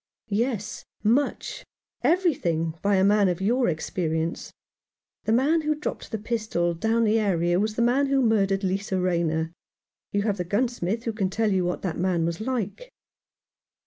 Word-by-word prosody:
"Yes, 220 0 -1 0.2
much 245 +7 0 0.2
— - - -42
everything 175 - 0
— - - -38
by 200 0 +2
a 190 - +3
man 200 -1 +4
of 175 0 -1
your 240 +5 +2
experience. 160 0 -2 0.7
The - - +1
man 285 +8 +3
who 305 0 0
dropped 300 - -5
the 220 - -1
pistol 210 -6 -1
down 225 +7 +1
the 220 0 +3
area 175 -4 +1
was 215 +1 0
the 235 - +2
man 265 +4 +3
who 275 0 +2
murdered 200 -3 +2
Lisa 190 0 -1
Rayner. 170 -2 0 0.6
You 200 0 0
have 205 -2 0
the 180 - -1
gunsmith 225 +1 -1
who 230 - -2
can 195 -3 -1
tell 215 +2 0
you 185 -2 +1
what 180 - -2
that 175 -4 -2
man 175 -2 +1
was 170 +3 -3
like." 255 - -3
205 Hz, 175 wpm, -25 LUFS, 180-230 Hz, 0.7 s, man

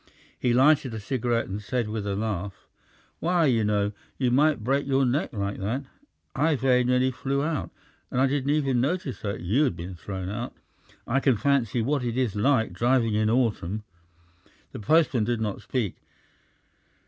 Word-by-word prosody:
He 125 - +1
lighted 130 -1 +4
a - - -4
cigarette 120 +1 -1
and 100 +2 -5
said 120 +1 -2
with 105 -1 -4
a 100 - -1
laugh: 100 -2 -4 0.5
"Why 170 0 +2
you 120 -6 +3
know, 105 -1 +1 0.3
you 125 -2 +1
might 145 -2 +3
break 135 +4 0
your 135 -1 +3
neck 130 +5 0
like 100 -4 -3
that! 115 +8 -2 0.5
I 155 +3 +2
very 130 -2 +3
nearly 125 +1 +2
flew 135 +2 -2
out, 155 -1 -2 0.4
and 125 - -1
I 135 - +5
didn't 135 0 0
even 135 -5 +2
notice 145 -1 -2
you 100 +5 0
had 135 - +1
been 90 +3 -7
thrown 95 +1 -6
out. 105 - -5 0.5
I 135 +4 +1
can 135 -4 +2
fancy 120 -1 +1
what 140 +2 0
it 120 0 -2
is 125 -6 0
like 115 +2 +2
driving 120 -2 +2
in 110 0 +2
autumn!" 110 -4 0 0.9
The - - -7
postman 135 +1 +3
did 120 0 -1
not 105 -3 -3
speak. 115 -8 -2
125 Hz, 170 wpm, -26 LUFS, 105-135 Hz, 0.9 s, I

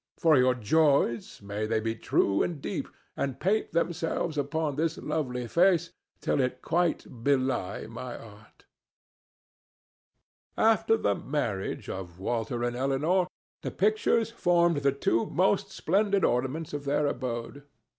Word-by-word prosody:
For 160 -2 +4
your 130 -1 +4
joys, 125 -3 +1
may 105 +2 -3
they 110 0 +1
be 115 +1 -1
true 100 -3 +1
and 170 -4 -1
deep, - - -4 0.3
and 135 -2 -3
paint 210 +4 +1
themselves 170 -1 -1
upon 145 +1 -1
this 160 +2 0
lovely 125 -5 -2
face 175 +2 +3 0.3
till - - 0
it 125 -1 -2
quite 165 -8 -1
belie 130 -8 0
my 120 +2 -7
art!" 105 -1 -15 1.9
After 225 0 +4
the 100 - +1
marriage 110 -6 -3
of 90 -2 -6
Walter 120 +4 -2
and 120 0 -1
Elinor 145 +8 +1 0.3
the - - -3
pictures 215 +2 +1
formed 175 -6 +3
the 140 -1 +2
two 115 -4 0
most 190 +2 +1
splendid 200 +2 +1
ornaments 130 +6 -1
of 145 -1 -4
their 145 +1 +1
abode. 130 0 -3
140 Hz, 135 wpm, -28 LUFS, 120-170 Hz, 1.9 s, For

